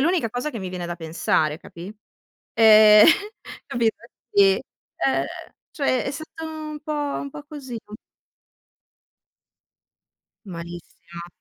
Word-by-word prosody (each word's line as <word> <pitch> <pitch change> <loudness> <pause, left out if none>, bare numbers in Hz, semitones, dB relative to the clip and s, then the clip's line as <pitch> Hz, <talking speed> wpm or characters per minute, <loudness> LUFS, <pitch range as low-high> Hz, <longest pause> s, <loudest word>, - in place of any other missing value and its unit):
l'unica 320 - +1
cosa 245 +5 -3
che 235 - -6
mi 185 -2 -6
viene 180 -1 -5
da 175 0 -5
pensare, 160 -1 0
capì? 180 +5 -11 0.6
Ehm, 215 -2 +8 0.6
capito? 230 -2 0 0.3
Sì, 195 -1 +5 0.5
uhm, 135 +1 +1 0.5
cioè, 275 -4 0
è 270 - -2
stato 315 +2 -8
un 310 -1 -7
po' 305 - -3
un 290 -1 -3
po' 295 - -9
così, 275 -6 -7
un 210 0 -10 2.6
Malissimo. 170 0 -10
220 Hz, 115 wpm, -23 LUFS, 175-290 Hz, 2.6 s, Ehm